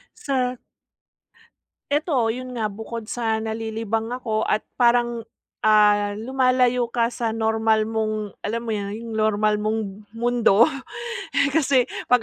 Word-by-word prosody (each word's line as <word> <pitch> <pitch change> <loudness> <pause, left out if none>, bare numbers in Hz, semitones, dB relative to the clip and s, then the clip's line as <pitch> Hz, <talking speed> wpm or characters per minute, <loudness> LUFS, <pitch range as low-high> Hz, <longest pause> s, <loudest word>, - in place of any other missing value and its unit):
Sa 255 -2 -1 1.3
Ito 285 -6 +1
yun 255 +2 -5
nga, 220 -3 -1
bukod 220 +2 -7
sa 225 -2 -1
nalilibang 225 0 -3
ako 220 -3 -1
at 215 - +1 0.2
parang, 240 -1 +3 0.4
ah, 210 -1 +4
lumalayo 250 0 +2
ka 230 -1 +2
sa 235 -2 -2
normal 220 -1 +2
mong, 215 -2 -2
alam 230 +2 -2
mo - - -2
yun, 200 -1 -3
yung 230 0 -7
normal 215 0 +2
mong 215 +1 0 0.4
mundo, 235 -2 +4 0.7
eh, 280 0 +3
kasi 275 -5 +3 0.2
‘pag 250 -1 +5
225 Hz, 130 wpm, -23 LUFS, 215-245 Hz, 1.3 s, pag